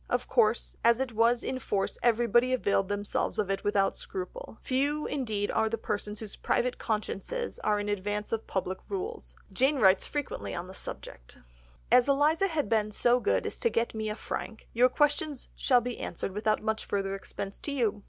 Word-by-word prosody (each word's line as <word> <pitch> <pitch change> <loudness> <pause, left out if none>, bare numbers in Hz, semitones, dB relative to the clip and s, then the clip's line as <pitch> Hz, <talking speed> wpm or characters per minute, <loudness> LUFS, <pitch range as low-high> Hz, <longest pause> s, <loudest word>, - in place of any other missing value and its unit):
Of - - 0
course - - +2
as 235 +1 +5
it 265 -2 -1
was 230 +2 +3
in 260 0 -2
force 195 -5 -2
everybody 240 +1 +3
availed 200 -5 +2
themselves 205 0 -1
of 205 -3 0
it 195 - -2
without 200 -1 +2
scruple, 185 +3 -7
few 285 +3 0
indeed 220 -7 -1
are 220 - +2
the 230 - -1
persons 210 -1 -3
whose 215 -2 -7
private 250 0 0
consciences 230 - -3
are 210 - +1
in 205 - -3
advance 205 +1 -2
of 225 -1 -2
public 190 0 -2
rules; 405 +4 -4 0.2
Jane 270 +3 +3
writes 195 -5 +5
frequently 290 -2 -4
on 170 - -4
the 185 - -10
subject— - - -8 0.5
"As 245 +1 +6
Eliza 300 +7 +3
has 320 -5 0
been 215 0 +1
so 240 +4 +3
good - - +1
as - - -4
to 470 - +2
get 235 - 0
me 220 -1 -2
a 210 - -2
frank, 220 0 -6
your 245 +2 +5
questions 295 0 0
shall 250 -3 +4
be 245 0 -4
answered 180 - -4
without 215 +2 0
much 220 0 -1
further 195 -1 -1
expense 195 0 -6
to 290 - -4
you.... 230 -7 0
225 Hz, 190 wpm, -29 LUFS, 205-255 Hz, 0.5 s, As